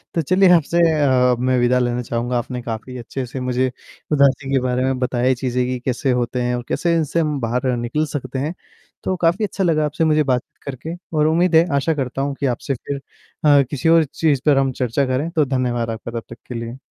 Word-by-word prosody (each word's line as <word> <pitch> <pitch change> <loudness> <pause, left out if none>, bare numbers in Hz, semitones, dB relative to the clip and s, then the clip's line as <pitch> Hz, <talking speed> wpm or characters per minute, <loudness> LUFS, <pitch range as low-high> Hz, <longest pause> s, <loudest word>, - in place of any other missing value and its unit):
तो 165 - +2
चलिए 185 +5 +4
आपसे 170 +1 +1
अ, 130 -5 +3
मैं 130 0 +1
विदा 125 +1 +3
लेना 120 0 0
चाहूँगा, 120 +1 -2
आपने 125 +1 -4
काफ़ी 120 +1 -6
अच्छे 125 +2 -5
से 125 +2 -7
मुझे 125 0 0 0.4
उदासी 140 -1 +2
के 135 - +4
बारे 125 0 0
में 130 0 0
बताई, 125 0 +1
चीज़ें 125 0 -1
कि 125 -1 -2
कैसे 130 +1 0
होते 120 +1 -2
हैं 125 0 0
और 120 - -4
कैसे 170 -1 +1
इनसे 160 +1 0
हम 150 -3 0
बाहर 125 +2 0
निकल 120 +6 -1
सकते 130 -1 -4
हैं। 150 +6 -2 0.5
तो 185 - 0
काफ़ी 175 +6 +2
अच्छा 195 - -3
लगा 155 -4 +2
आपसे 150 +2 -1
मुझे 155 -1 +3
बातचीत 125 -3 -2
करके 140 +5 -6 0.2
और 150 - +4
उम्मीद 170 +2 +2
है, 165 +2 +6
आशा 140 +4 +1
करता 135 -2 -3
हूँ 140 0 -2
कि 140 - -1
आपसे 130 +2 -1
फिर 140 +2 -5 0.4
अ, 145 -1 +7
किसी 145 +3 0
और 165 0 +6
चीज़ 145 -1 0
पर 145 -2 +4
हम 135 -1 +2
चर्चा 125 +2 0
करें, 130 +5 -1
तो 155 -4 +1
धन्यवाद 125 -3 -1
आपका 115 +1 -5
तब - - -13
तक - - -10
के 125 - -6
लिए। 115 +1 -5
130 Hz, 225 wpm, -20 LUFS, 125-150 Hz, 0.5 s, अ